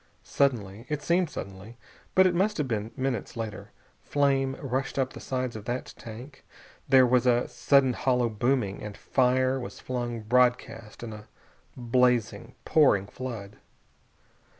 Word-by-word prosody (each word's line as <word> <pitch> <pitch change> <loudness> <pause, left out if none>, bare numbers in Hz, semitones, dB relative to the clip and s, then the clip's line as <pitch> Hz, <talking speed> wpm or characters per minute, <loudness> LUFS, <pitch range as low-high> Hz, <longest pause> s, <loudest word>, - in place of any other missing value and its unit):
Suddenly 115 -5 -1
it 150 -1 -3
seemed 175 +1 +2
suddenly, 100 0 -8 0.4
but 190 - +6
it 185 - +3
must 205 +4 +1
have 150 -4 -1
been 110 -2 -2
minutes 130 -4 -3
later 110 -2 -5 0.3
flame 135 -2 +1
rushed 135 0 -3
up 130 -1 0
the - - -9
sides 130 -2 -3
of 110 -1 -8
that 120 +2 -4
tank, 120 +5 -11 0.5
there 130 -1 +7
was 125 0 +3
a 120 0 +3
sudden 140 -3 +3
hollow 125 -3 +1
booming, 115 -2 -1
and 105 -1 -7
fire 130 0 +1
was 125 - -8
flung 120 -2 -4
broadcast 120 -1 0
in 110 -2 -6
a 105 0 -11 0.5
blazing, 120 -1 +1
pouring 130 -11 +4
flood. 110 -3 -7
125 Hz, 145 wpm, -27 LUFS, 115-135 Hz, 0.5 s, there